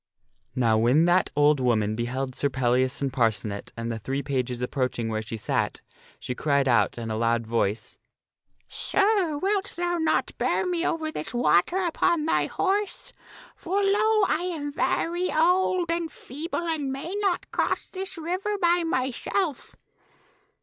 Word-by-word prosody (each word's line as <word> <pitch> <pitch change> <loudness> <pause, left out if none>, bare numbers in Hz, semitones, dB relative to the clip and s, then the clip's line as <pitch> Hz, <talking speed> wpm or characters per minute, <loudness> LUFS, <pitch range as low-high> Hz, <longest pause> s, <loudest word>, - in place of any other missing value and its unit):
Now 115 -3 +3
when 125 +8 +4
that 175 +1 +3
old 145 0 +4
woman 110 -4 +1
beheld 130 +3 -3
Sir 140 - 0
Pellias 130 +1 +1
and 135 -2 -1
Parcenet 110 -5 0
and 115 0 -3
the 115 - -4
three 135 +5 -3
pages 125 -3 -2
approaching 125 -3 -1
where 110 -1 -2
she 110 +1 -6
sat, 105 - -1 0.4
she 125 - -4
cried 140 +1 +1
out 115 -4 +2
in 115 -1 -4
a - - -1
loud 115 +1 +1
voice, 110 -1 -2 0.4
" - - -45 0.2
Sir, 395 -7 +2
wilt 395 +4 -1
thou 350 0 0
not 320 - 0
bear - - +1
me 350 -2 -1
over 320 -3 -1
this 190 - -5
water 245 - +3
upon 340 -3 +1
thy 320 - +1
horse? 410 +5 -2 0.4
For, 390 +4 -1
lo! 425 +2 +3
I 360 +1 0
am 290 -4 -4
very 345 +3 0
old 355 +1 +2
and 335 -2 -2
feeble 315 +8 -5
and 300 -5 -1
may 275 +7 -5
not 390 -4 -1
cross - - 0
this 380 -1 -6
river 370 +6 -2
by 345 -1 +2
myself." 285 +3 -2
260 Hz, 155 wpm, -26 LUFS, -, 0.4 s, when